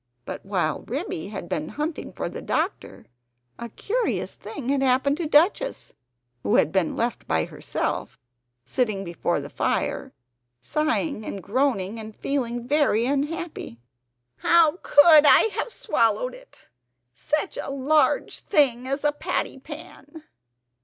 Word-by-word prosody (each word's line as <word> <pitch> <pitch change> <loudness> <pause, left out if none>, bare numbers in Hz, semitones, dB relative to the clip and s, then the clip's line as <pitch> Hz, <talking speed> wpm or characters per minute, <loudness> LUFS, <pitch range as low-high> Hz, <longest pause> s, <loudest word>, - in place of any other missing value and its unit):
But - - -6
while - - -1
Ribby 160 - -3
had 195 -4 -6
been 155 -2 -2
hunting 300 +6 -4
for - - -4
the - - -7
doctor - - -3 0.5
a 235 - -6
curious 465 - -2
thing 265 -4 -7
had 275 -1 +2
happened 270 +2 +2
to 335 -2 -2
Duchess, 355 +12 +2 0.5
who 100 - +1
had 155 - +4
been 190 -4 0
left 235 0 -2
by 80 -1 +1
herself, - - -4 0.5
sitting 215 -6 -1
before 170 -2 -1
the - - -6
fire, - - -1 0.5
sighing 305 - -1
and 195 -3 -6
groaning 225 -3 0
and 220 -1 -9
feeling 245 -4 -2
very 280 -6 +3
unhappy. 295 - -3 0.6
"How 335 -1 +4
COULD 300 0 +7
I 445 - +7
have 480 - -3
swallowed - - 0
it! - - -16 0.5
such 300 - -2
a - - -7
large 280 +3 +1
thing 260 - +2
as 275 +2 -2
a 295 - +3
patty 290 -2 -3
pan!" 300 +1 -11
280 Hz, 135 wpm, -24 LUFS, 225-310 Hz, 0.6 s, COULD